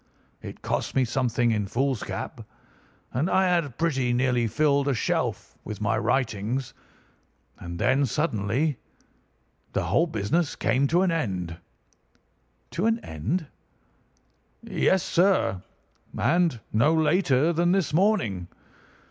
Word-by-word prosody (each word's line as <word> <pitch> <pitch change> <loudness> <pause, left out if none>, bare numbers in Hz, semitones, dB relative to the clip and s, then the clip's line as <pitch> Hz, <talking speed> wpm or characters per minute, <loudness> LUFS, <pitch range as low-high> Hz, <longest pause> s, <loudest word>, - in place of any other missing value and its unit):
It - - -10
cost - - -2
me 130 -1 +3
something 120 -1 +1
in 105 -2 -1
foolscap, 130 +2 -2 0.7
and 145 +9 0
I 190 - +3
had 170 -8 0
pretty 135 -7 +1
nearly 125 -1 +1
filled 140 +2 +2
a 140 - +1
shelf 105 - -2
with 105 - -6
my 105 -1 +1
writings. 120 0 -1 0.9
And 85 0 -7
then 135 +8 +2
suddenly 130 +1 -1 0.9
the - - 0
whole 170 - +2
business 145 - -1
came 130 +5 +1
to 175 +5 +3
an 185 - +2
end." 95 - -2 1.2
"To 185 +7 0
an 225 0 +2
end?" 120 - -2 1.2
"Yes, 190 -3 +1
sir. 175 - +2 0.6
And 170 -7 +2
no 145 +9 +4
later 160 -1 +2
than 175 +2 +2
this 190 -5 +1
morning. 155 - +1
135 Hz, 120 wpm, -26 LUFS, 115-170 Hz, 1.2 s, no